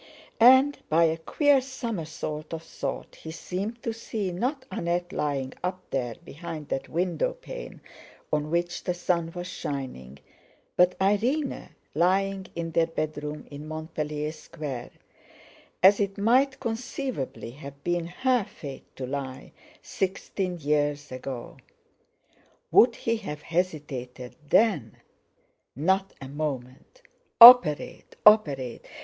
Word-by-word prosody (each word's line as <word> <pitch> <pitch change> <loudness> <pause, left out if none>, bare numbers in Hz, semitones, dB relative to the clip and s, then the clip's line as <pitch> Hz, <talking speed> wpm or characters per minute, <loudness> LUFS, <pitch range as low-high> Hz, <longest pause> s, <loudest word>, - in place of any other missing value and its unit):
And, 260 +4 +7
by 165 +2 +4
a 160 -1 +3
queer 285 - +3
somersault 170 - -5
of 160 - -8
thought, 160 - -6
he 160 - -9
seemed 195 +8 -5
to 230 - -2
see 220 -4 -4
not 255 - -2
Annette 175 0 -2
lying 140 -5 -2
up 180 +1 -2
there 120 -4 -2
behind 160 -1 -8
that 135 - -3
window 180 - 0
pane - - -9 0.5
on 150 0 0
which 175 +1 -1
the 180 - -1
sun 170 -2 0
was 175 0 -4
shining, 130 - -6 0.6
but 180 0 +4
Irene 235 +10 0 0.2
lying 190 +4 +1
in 165 -1 -3
their 165 0 +2
bedroom 150 -2 -4
in 145 +2 -8
Montpellier 155 -1 -4
Square, 150 -5 -7 0.9
as 195 +2 +7
it 200 -1 -1
might 260 +6 +3
conceivably 230 - -4
have 140 +1 -11
been 175 -1 -1
her 250 +6 +1
fate 145 -8 -10
to 130 - -5
lie, 130 -1 -5 0.3
sixteen 190 -1 -3
years 145 -2 0
ago. 130 -1 -6 1.1
Would 235 0 +6
he 230 0 -1
have 150 -9 -7
hesitated 145 -8 -3
then? 195 - +3 0.8
Not 190 +7 +1
a 135 - -8
moment! 140 - -5 0.4
Operate, 235 - +8
operate! 145 - +4
170 Hz, 120 wpm, -27 LUFS, 145-205 Hz, 1.1 s, Operate